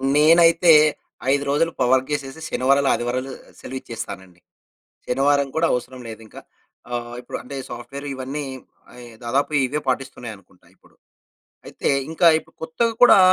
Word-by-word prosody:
నేనైతే 165 Hz, +2 st, +6 dB, 0.6 s
5 140 Hz, 0 st, +2 dB
రోజులు 165 Hz, +4 st, +1 dB
ప -, -, +3 dB
వర్క్ 130 Hz, +1 st, +2 dB
జేసేసి, 145 Hz, +1 st, -4 dB
శనివారాలు, 140 Hz, +2 st, +2 dB
ఆదివారాలు 125 Hz, +3 st, -2 dB, 0.3 s
సెలవిచ్చేస్తానండి. 100 Hz, -8 st, -8 dB, 0.7 s
శనివారం 140 Hz, +2 st, +2 dB
కూడా 165 Hz, -, +3 dB
అవసరం 125 Hz, +1 st, -4 dB
లేదింకా. 110 Hz, -1 st, -10 dB, 0.5 s
ఆహ్, 120 Hz, 0 st, -4 dB
ఇప్పుడు -, -, -7 dB
అంటే 140 Hz, +2 st, -8 dB
సాఫ్ట్‌వేరు 140 Hz, +4 st, -8 dB
ఇవన్నీ 135 Hz, +3 st, -5 dB, 0.5 s
అయే, 125 Hz, -1 st, -12 dB, 0.2 s
దాదాపు 135 Hz, +6 st, 0 dB, 0.2 s
ఇవే 150 Hz, +4 st, -3 dB
పాటిస్తున్నాయనుకుంటా 120 Hz, -8 st, -5 dB
ఇప్పుడు. -, -, -26 dB, 0.7 s
అయితే -, -, -3 dB, 0.2 s
ఇంకా 165 Hz, +1 st, +3 dB
ఇప్పుడు -, -, -22 dB
కొత్తగ 160 Hz, +9 st, 0 dB
కూడా 245 Hz, -, +8 dB
135 Hz, 125 wpm, -22 LUFS, 120-150 Hz, 0.7 s, కూడా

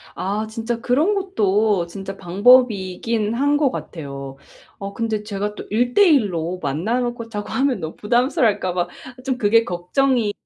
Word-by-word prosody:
아. 210 Hz, +3 st, -2 dB
진짜 225 Hz, +1 st, -3 dB
그런 295 Hz, -, +2 dB
것도 210 Hz, -, +1 dB
진짜 195 Hz, +2 st, -7 dB
방법이긴 210 Hz, +1 st, +2 dB
한 285 Hz, +4 st, +2 dB
것 290 Hz, -3 st, +2 dB
같아요. 140 Hz, -4 st, -7 dB, 0.4 s
어 200 Hz, 0 st, -6 dB
근데 220 Hz, -1 st, -2 dB
제가 210 Hz, 0 st, -4 dB
또 -, -, -8 dB
1:1 245 Hz, -, +4 dB
로 170 Hz, +3 st, -3 dB
만나 170 Hz, -, -1 dB
놓고 240 Hz, -2 st, -4 dB
자고 205 Hz, -2 st, -5 dB
하면 265 Hz, -4 st, 0 dB
너무 160 Hz, -2 st, -6 dB
부담스러워할까 225 Hz, -5 st, +1 dB
봐 175 Hz, -1 st, 0 dB, 0.4 s
좀 260 Hz, -2 st, -1 dB
그게 225 Hz, +1 st, +4 dB
걱정이 215 Hz, +6 st, 0 dB
215 Hz, 280 characters per minute, -21 LUFS, 190-245 Hz, 0.4 s, 1:1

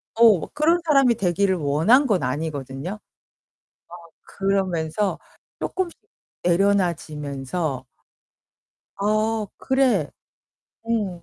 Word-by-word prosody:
어 225 Hz, -6 st, +5 dB
그런 320 Hz, +4 st, +2 dB
사람이 275 Hz, -6 st, +4 dB
되기를 190 Hz, -1 st, +1 dB
원한 165 Hz, -, +3 dB
건 190 Hz, -, +1 dB
아니거든요. 140 Hz, +3 st, -4 dB, 1.1 s
어 -, -, -25 dB, 0.2 s
그러면서 195 Hz, -1 st, -1 dB, 0.4 s
쪼끔씩 370 Hz, -2 st, -3 dB, 0.5 s
내려놔 185 Hz, 0 st, +3 dB
지면서 145 Hz, -2 st, -5 dB, 1.1 s
'어 215 Hz, +2 st, 0 dB
그래. 255 Hz, -, +1 dB, 0.8 s
응. 200 Hz, -7 st, -1 dB
190 Hz, 185 characters per minute, -23 LUFS, 160-225 Hz, 1.1 s, 어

